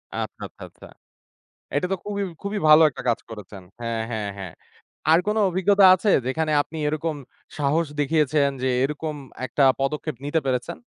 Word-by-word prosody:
আচ্ছা, - - -5
আচ্ছা, - - -14
আচ্ছা - - -15 0.9
এটা 145 +5 +1
তো 195 - +2
খুবই 205 -1 -3 0.2
খুবই 205 +1 -3
ভালো 155 +1 +9
একটা - - -9
কাজ 115 - +1
করেছেন। 105 -3 -10 0.2
হ্যাঁ, 115 -1 -2
হ্যাঁ, 105 -3 -3
হ্যাঁ 95 -4 -7 0.6
আর 165 - +6
কোনো 215 +1 +1
অভিজ্ঞতা 190 +2 +4
আছে 185 +3 -1 0.2
যেখানে 155 +4 -1
আপনি 160 +2 -9
এরকম 155 +1 -2 0.4
সাহস 150 +3 +1
দেখিয়েছেন 145 -1 +2
যে - - +2 0.2
এরকম 150 +2 -3 0.3
একটা 135 +3 0 0.2
পদক্ষেপ 150 +2 -2
নিতে 145 +3 +1
পেরেছেন? 130 +6 -2
150 Hz, 160 wpm, -24 LUFS, 130-165 Hz, 0.9 s, ভালো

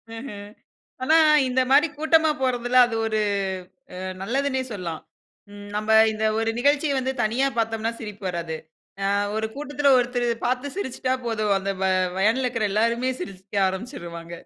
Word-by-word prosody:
ம்ஹ்ம். 205 -4 -8 0.5
ஆனா 315 +5 +4 0.3
இந்த 255 +1 +1
மாரி 295 +4 +6
கூட்டமா 315 0 +4
போறதுல 245 -1 0
அது 225 -2 -3
ஒரு 220 -1 0 0.7
அ - - -8 0.3
நல்லதுன்னே 265 +4 0
சொல்லலாம். 170 -5 -5 0.5
ம் 205 0 -10
நம்ப 215 +1 -2 0.2
இந்த 215 0 -3
ஒரு 225 0 +1
நிகழ்ச்சி 285 +3 +2
வந்து 260 +1 -1
தனியா 240 +5 +1
பாத்தோம்ன்னா 225 0 0
சிரிப்பு 210 -2 -8
வராது. 170 -2 -4 0.5
அ - - +2 0.3
ஒரு 220 0 0
கூட்டத்தில 290 0 -1
ஒருத்தரு 245 0 0 0.2
பார்த்து 250 +3 -1
சிரிச்சிட்டா 260 -7 -2
போதும் 215 -3 +1
அந்த 195 +1 -3
வ - - +2 0.3
வேன்ல 225 +6 +2
இருக்கிற 230 -3 -1
எல்லாருமே 230 +4 +1
சிரிக்க 195 0 -2
ஆரம்பிச்சிருவாங்க 175 - -7
230 Hz, 145 wpm, -24 LUFS, 205-260 Hz, 0.7 s, மாரி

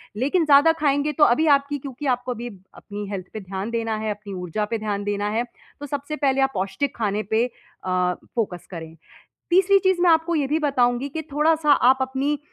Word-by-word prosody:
लेकिन 290 - +1
ज़्यादा 290 +2 +6
खाएँगे 285 0 +2
तो 295 +1 +2
अभी 310 +6 +4
आपकी 280 +1 -5
क्योंकि 275 +1 -8
आपको 250 +1 -6
अभी 240 +1 -6 0.3
अपनी 205 0 -7
हेल्थ 185 -2 -5
पे 215 - -5
ध्यान 195 +2 -5
देना 225 -2 -1
है, 215 0 -2
अपनी 205 -1 -7
ऊर्जा 180 +4 -2
पे 230 - 0
ध्यान 210 -2 -3
देना 205 0 -1
है। 235 - +1 0.4
तो 290 - -6
सबसे 285 +2 -4
पहले 275 -2 +1
आप 270 0 +2
पौष्टिक 195 +9 -2
खाने 210 -1 -1
पे 220 +4 +1 0.4
अ, 180 -1 +1 0.2
फोकस 190 -7 -2
करें। 165 -2 -8 0.5
तीसरी 385 +2 +5
चीज़ 375 -2 +1
मैं 355 - +5
आपको 325 +1 +3
ये 285 -3 +1
भी 300 - +1
बताऊँगी 260 -3 +1
कि 315 +3 -4
थोड़ा-सा 305 0 +3
आप 260 -1 +5
अपनी 270 +3 -1
255 Hz, 200 wpm, -23 LUFS, 210-295 Hz, 0.5 s, ज़्यादा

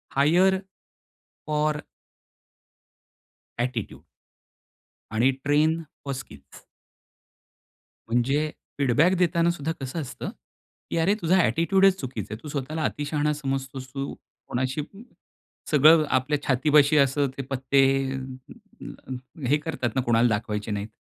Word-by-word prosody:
Higher 180 +7 +4 0.9
or 150 0 0 1.8
attitude. 120 -3 -3 1.1
आणि 120 +5 +3
train 155 +3 +2 0.2
for 140 - -2
skills. 130 -2 -11 1.5
म्हणजे 135 +6 +1 0.3
feedback 145 +6 +3
देताना 170 -1 +2
सुद्धा 160 -2 -3
कसं 135 +5 -4
असतं 135 - -6 0.6
की - - -2
"अरे 165 +5 +3
तुझा 180 +3 +3
ॲटिट्यूडच 190 +4 +3
चुकीचा 130 -4 -5
आहे. 110 - -7
तू - - -8
स्वतःला 150 +3 -3
अतिशहाणा 150 0 -1
समजतोस 135 -2 -4
तू." 140 0 -4 0.3
कोणाशी 130 +4 -1
अ, 195 +7 -12 0.7
सगळं 155 +1 +6
आपल्या 135 +3 +1
छातीपाशी 145 +3 +4
असं 140 +1 +3
ते - - -2
पत्ते 135 +1 +2 0.3
अं, 130 0 -9 0.3
हे 145 - +4
करतात 150 -5 -3
ना 130 - +2
कोणाला 120 -1 +3
दाखवायचे 105 0 -2
नाहीत. 105 0 -3
140 Hz, 110 wpm, -25 LUFS, 130-155 Hz, 1.8 s, सगळं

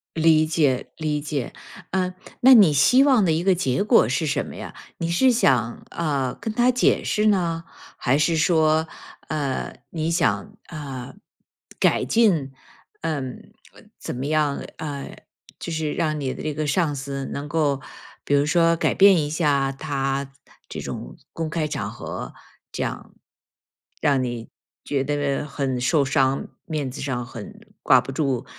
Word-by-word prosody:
理 160 -1 +4
解 150 -5 +1
理 150 -2 -1
解。 145 -3 -4 0.4
嗯， 185 -1 0 0.3
那 260 +1 +8
你 195 -10 +7
希 250 - +5
望 260 -7 +4
的 165 - +2
一 165 +2 0
个 190 -1 +4
结 135 -1 0
果 120 - +4
是 155 +5 0
什 140 - 0
么 - - -9
呀？ - - -8 0.2
你 170 0 -2
是 250 +10 +4
想， 125 - +1
呃， 140 -6 -1
跟 220 - -5
他 245 +1 +3
解 250 - +2
释 215 0 +1
呢？ 170 -5 +1 0.3
还 135 +3 +2
是 160 +2 +2
说， 160 -1 +3 0.4
呃， 145 -4 -2 0.2
你 160 0 -2
想， 200 +5 0
啊， 140 -5 -7 0.7
改 - - +3
进 175 - +2 0.5
嗯， 135 -5 -4 0.4
怎 - - -6
么 130 +2 -4
样， 150 -2 +1 0.2
啊， 145 -3 -5 0.5
就 170 - -5
是 155 -2 -2
让 155 -3 -1
你 130 -2 -2
的 - - -8
这 155 - -2
个 155 0 -2
上 155 -1 +1
司 135 0 -4
能 145 +1 -5
够 145 -3 +1 0.5
比 145 - +2
如 140 +1 +3
说 165 +2 +3
改 - - +1
变 195 -2 +6
一 145 - -3
下 145 -4 +1
他 135 -1 -2 0.4
这 - - -6
种 - - -7 0.2
公 165 -1 -4
开 155 -1 -1
场 - - -3
合 - - -7 0.4
这 - - -2
样， - - -6 0.9
让 140 -3 +3
你 120 -2 -5 0.3
觉 135 -2 -1
得 145 -1 -1
很 135 -3 -2
受 140 +4 +2
伤， 135 0 +1 0.2
面 150 -5 -3
子 140 - -7
上 130 -3 -2
很 115 -4 -10 0.2
挂 130 -1 +6
不 135 - -7
住。 135 -3 -1
150 Hz, 170 characters per minute, -23 LUFS, 135-165 Hz, 0.9 s, 那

